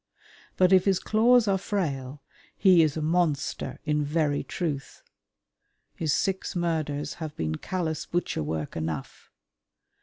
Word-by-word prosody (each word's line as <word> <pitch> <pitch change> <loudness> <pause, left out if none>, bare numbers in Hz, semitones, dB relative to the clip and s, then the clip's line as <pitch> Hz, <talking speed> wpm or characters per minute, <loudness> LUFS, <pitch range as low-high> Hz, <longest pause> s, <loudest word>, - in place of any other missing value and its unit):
But 185 0 +5
if 185 -1 +5
his 195 -2 +3
claws 230 +2 +4
are 195 -1 +2
frail, 145 -9 -3 0.3
he 185 -4 +6
is 155 -1 +1
a 155 - -2
monster 160 -3 0
in 150 -1 +1
very 145 -1 0
truth. 150 -6 -4 0.9
His 160 -3 -1
six 190 +5 -1
murders 155 -4 -1
have 155 -2 -5
been 80 -1 -1
callous 165 -4 -3
butcher 175 - -1
work 75 0 -3
enough. 80 -3 -5
160 Hz, 130 wpm, -27 LUFS, 145-185 Hz, 0.9 s, he